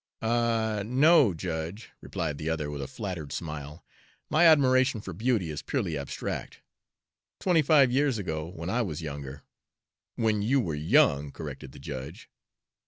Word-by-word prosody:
"Ah, 115 Hz, -2 st, +1 dB
no, 135 Hz, -, +5 dB
judge," 85 Hz, +5 st, -5 dB
replied 80 Hz, -6 st, -4 dB
the 80 Hz, -, -3 dB
other, 75 Hz, -2 st, -2 dB
with 70 Hz, -1 st, -5 dB
a 70 Hz, -, -4 dB
flattered 90 Hz, -9 st, -6 dB
smile, 75 Hz, 0 st, -6 dB, 0.5 s
"my 165 Hz, +3 st, +6 dB
admiration 130 Hz, -5 st, +4 dB
for 95 Hz, -3 st, -7 dB
beauty 105 Hz, -4 st, 0 dB
is 75 Hz, -, -5 dB
purely 100 Hz, -, -2 dB
abstract. 70 Hz, -1 st, -5 dB, 0.8 s
Twenty 175 Hz, -4 st, +3 dB
five 140 Hz, -4 st, +5 dB
years 135 Hz, -1 st, +2 dB
ago, 80 Hz, -6 st, -3 dB
when 85 Hz, -1 st, -7 dB
I 125 Hz, -, +1 dB
was 85 Hz, -7 st, -4 dB
younger" 70 Hz, -2 st, -7 dB, 0.7 s
"When 110 Hz, -2 st, +1 dB
you 130 Hz, +7 st, +2 dB
were 85 Hz, -10 st, -1 dB
young," 75 Hz, -, +3 dB
corrected 65 Hz, -, -8 dB
the -, -, -13 dB
judge. 65 Hz, +4 st, -8 dB
95 Hz, 150 wpm, -28 LUFS, 75-125 Hz, 0.8 s, my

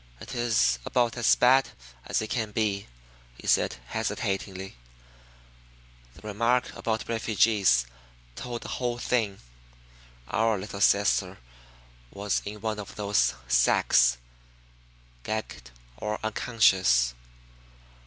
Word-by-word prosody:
"It -, -, -9 dB
is 110 Hz, -, +2 dB
about 120 Hz, -, 0 dB
as 120 Hz, -2 st, +4 dB
bad 130 Hz, +2 st, +4 dB, 0.4 s
as -, -, 0 dB
it 110 Hz, -, -7 dB
can 110 Hz, -3 st, -2 dB
be," 105 Hz, -2 st, -1 dB, 0.5 s
he -, -, -13 dB
said -, -, +2 dB
hesitatingly. 95 Hz, -2 st, -3 dB, 1.4 s
"The 110 Hz, -, -12 dB
remark 115 Hz, +4 st, 0 dB
about 110 Hz, -1 st, -3 dB
refugees 110 Hz, -, +2 dB, 0.5 s
told 120 Hz, -1 st, -6 dB
the -, -, -8 dB
whole 120 Hz, -1 st, -2 dB
thing. 110 Hz, -5 st, -1 dB, 0.9 s
Our 110 Hz, -, +1 dB
little 100 Hz, +1 st, -7 dB
sister 100 Hz, -2 st, +2 dB, 0.7 s
was 100 Hz, +4 st, -2 dB
in 105 Hz, 0 st, -7 dB
one 110 Hz, -1 st, -2 dB
of 100 Hz, -, -8 dB
those 105 Hz, 0 st, +1 dB
sacks, -, -, +4 dB, 1.0 s
gagged 65 Hz, -, -5 dB, 0.3 s
or 105 Hz, +11 st, -3 dB
unconscious. 95 Hz, -, +2 dB
105 Hz, 105 wpm, -27 LUFS, 95-115 Hz, 1.4 s, as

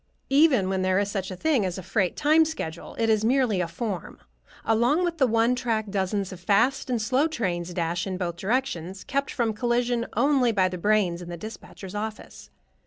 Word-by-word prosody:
Even 275 Hz, -, +4 dB
when 190 Hz, 0 st, -1 dB
there 185 Hz, 0 st, +2 dB
is 200 Hz, 0 st, 0 dB
such 190 Hz, -3 st, -3 dB
a 185 Hz, -, -5 dB
thing 275 Hz, -, +1 dB
as 185 Hz, -2 st, -2 dB
a 190 Hz, -, -6 dB
freight 185 Hz, 0 st, 0 dB
time 310 Hz, +2 st, +4 dB
schedule, 175 Hz, -, -5 dB
it 230 Hz, -, +1 dB
is 215 Hz, -1 st, +2 dB
merely 240 Hz, -5 st, +2 dB
a 175 Hz, -, -1 dB
form. 195 Hz, +2 st, -5 dB, 0.5 s
Along 240 Hz, +10 st, +2 dB
the 330 Hz, -6 st, +1 dB
one 230 Hz, +1 st, +3 dB
track 225 Hz, -4 st, -2 dB
dozens 195 Hz, 0 st, -1 dB
of 180 Hz, -, -10 dB
fast 225 Hz, +10 st, +2 dB
and 245 Hz, -2 st, 0 dB
slow 255 Hz, +7 st, +2 dB
trains 180 Hz, -, -3 dB
dash 175 Hz, +1 st, -2 dB
in 185 Hz, -1 st, -3 dB
both 170 Hz, -2 st, -3 dB
directions, 190 Hz, -4 st, -2 dB
kept 275 Hz, 0 st, -2 dB
from 230 Hz, -3 st, -1 dB
collision 240 Hz, +1 st, 0 dB
only 275 Hz, -4 st, +3 dB
by 190 Hz, -4 st, +2 dB
the 180 Hz, -1 st, -6 dB
brains 190 Hz, -3 st, +1 dB
in 175 Hz, -, -8 dB
the 175 Hz, -, -6 dB
dispatcher's 200 Hz, -1 st, -9 dB
office. 215 Hz, +1 st, -6 dB
215 Hz, 195 wpm, -25 LUFS, 185-250 Hz, 0.5 s, Even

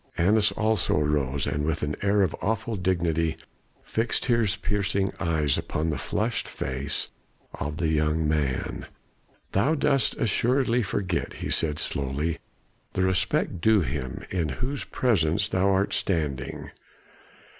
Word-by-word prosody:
Annas 105 Hz, +4 st, +4 dB
also 110 Hz, -7 st, +2 dB
arose, 75 Hz, -2 st, 0 dB
and 75 Hz, -, -1 dB
with 80 Hz, 0 st, -1 dB
an 75 Hz, +1 st, -1 dB
air 100 Hz, 0 st, +3 dB
of 90 Hz, -, 0 dB
awful 110 Hz, +1 st, -1 dB
dignity 85 Hz, -4 st, 0 dB, 0.5 s
fixed 115 Hz, +1 st, -1 dB
his 115 Hz, -5 st, +2 dB
piercing 100 Hz, -1 st, 0 dB
eyes 80 Hz, -4 st, +1 dB
upon 80 Hz, +1 st, -2 dB
the 70 Hz, -, -3 dB
flushed -, -, -1 dB
face 65 Hz, +2 st, -2 dB, 0.4 s
of 75 Hz, +1 st, -4 dB
the 80 Hz, -2 st, 0 dB
young 75 Hz, 0 st, +1 dB
man. 75 Hz, -4 st, -1 dB, 0.6 s
"Thou 130 Hz, +12 st, +2 dB
dost 140 Hz, -4 st, +2 dB
assuredly 125 Hz, +2 st, +2 dB
forget," 95 Hz, -4 st, -2 dB
he -, -, -5 dB
said 75 Hz, -2 st, 0 dB
slowly, 70 Hz, +5 st, -1 dB, 0.5 s
"the 95 Hz, -, +1 dB
respect 95 Hz, -1 st, +1 dB
due 110 Hz, +1 st, +5 dB
him 65 Hz, -3 st, -4 dB
in 85 Hz, -5 st, 0 dB
whose 125 Hz, -, -3 dB
presence 100 Hz, -6 st, +1 dB
thou 95 Hz, -1 st, +2 dB
art 95 Hz, +1 st, +2 dB
standing. 75 Hz, -7 st, -2 dB
85 Hz, 135 wpm, -26 LUFS, 75-105 Hz, 0.6 s, due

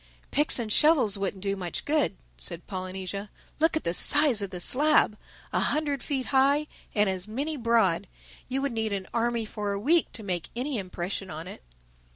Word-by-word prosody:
"Picks 295 Hz, +2 st, +5 dB
and 225 Hz, -4 st, -1 dB
shovels 295 Hz, -10 st, +4 dB
wouldn't 195 Hz, -1 st, -4 dB
do 200 Hz, 0 st, 0 dB
much 180 Hz, -3 st, -5 dB
good," 295 Hz, -9 st, +1 dB, 0.2 s
said 170 Hz, -1 st, -7 dB
Polynesia. 190 Hz, +1 st, -5 dB, 0.3 s
"Look 320 Hz, 0 st, +3 dB
at -, -, -4 dB
the 170 Hz, -, -1 dB
size 290 Hz, +1 st, +5 dB
of 200 Hz, -, -3 dB
the 180 Hz, -2 st, -7 dB
slab: 285 Hz, -, +4 dB, 0.4 s
a -, -, +2 dB
hundred 290 Hz, -3 st, 0 dB
feet 270 Hz, -4 st, -3 dB
high 280 Hz, +3 st, +4 dB, 0.3 s
and 210 Hz, -1 st, +4 dB
as 190 Hz, 0 st, -2 dB
many 280 Hz, +8 st, -3 dB
broad. 230 Hz, -, +2 dB, 0.4 s
You 270 Hz, +2 st, -1 dB
would 280 Hz, -, 0 dB
need 220 Hz, -2 st, -2 dB
an 195 Hz, -1 st, -3 dB
army 235 Hz, -1 st, 0 dB
for 210 Hz, -1 st, -3 dB
a 200 Hz, -, -3 dB
week 320 Hz, +9 st, +2 dB
to 225 Hz, -, -4 dB
make 180 Hz, -4 st, -3 dB
any 255 Hz, 0 st, -2 dB
impression 185 Hz, +1 st, -4 dB
on 160 Hz, +2 st, -5 dB
it." -, -, -9 dB
220 Hz, 190 wpm, -27 LUFS, 190-280 Hz, 0.4 s, Picks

